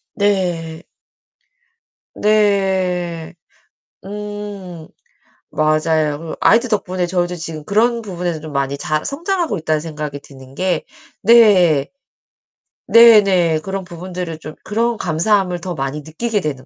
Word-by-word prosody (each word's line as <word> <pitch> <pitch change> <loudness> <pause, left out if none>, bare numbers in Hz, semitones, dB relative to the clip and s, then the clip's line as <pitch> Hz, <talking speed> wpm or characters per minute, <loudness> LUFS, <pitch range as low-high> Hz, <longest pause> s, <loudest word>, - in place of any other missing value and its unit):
네. 175 -5 -1 1.3
네. 190 -6 +1 0.7
음. 205 -4 -7 0.6
맞아요. 155 -1 +1
그 160 0 -7
아이들 235 +3 +4
덕분에 185 -4 -1
저도 175 0 -1
지금 160 -2 -7
그런 235 +3 +2
부분에서 175 -6 -4
좀 155 -1 -9
많이 140 0 -1
잘 155 +1 -2
성장하고 335 - -2
있다는 155 -1 0
생각이 150 -2 -6
드는 130 -1 -15
게 185 +3 -1 0.4
네. 190 -10 +5 1.0
네네. 200 -8 +6
그런 190 +3 -5
부분들을 175 -1 -6
좀 155 0 -9
그런 230 +2 0
감사함을 180 +1 0
더 180 0 -5
많이 135 +1 -3
느끼게 205 +8 -2
되는 140 -6 -4
180 Hz, 230 characters per minute, -18 LUFS, 155-205 Hz, 1.3 s, 네네